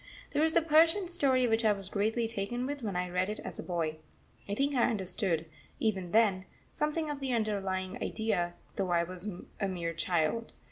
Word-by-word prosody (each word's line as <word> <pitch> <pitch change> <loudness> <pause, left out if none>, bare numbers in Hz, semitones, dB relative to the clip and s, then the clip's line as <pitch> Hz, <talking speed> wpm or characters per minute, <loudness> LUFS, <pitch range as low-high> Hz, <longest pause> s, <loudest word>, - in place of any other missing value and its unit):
There 295 - +2
is 320 +2 +2
a 335 - +5
Persian 330 +4 +5
story 270 -7 +2
which 225 0 +2
I 215 -1 +5
was 195 -2 -6
greatly 220 +4 0
taken 230 +3 -2
with 285 +1 -4
when 205 -5 -3
I 180 0 0
read 180 +2 +1
it 210 - -3
as - - -7
a - - -1
boy 165 -3 -2 0.5
I 200 - 0
think 280 +5 +1
I 245 -3 +3
understood, 185 -5 0 0.3
even 195 -5 0
then, 205 -4 +3 0.3
something 300 +1 0
of 290 - -4
the 265 -2 -1
underlying 195 -4 -1
idea, 175 -6 -1 0.2
though 190 -2 0
I 170 -1 +3
was 185 +3 -5 0.3
a 195 - +1
mere 170 -3 -2
child. 175 +6 0
210 Hz, 195 wpm, -31 LUFS, 185-255 Hz, 0.5 s, a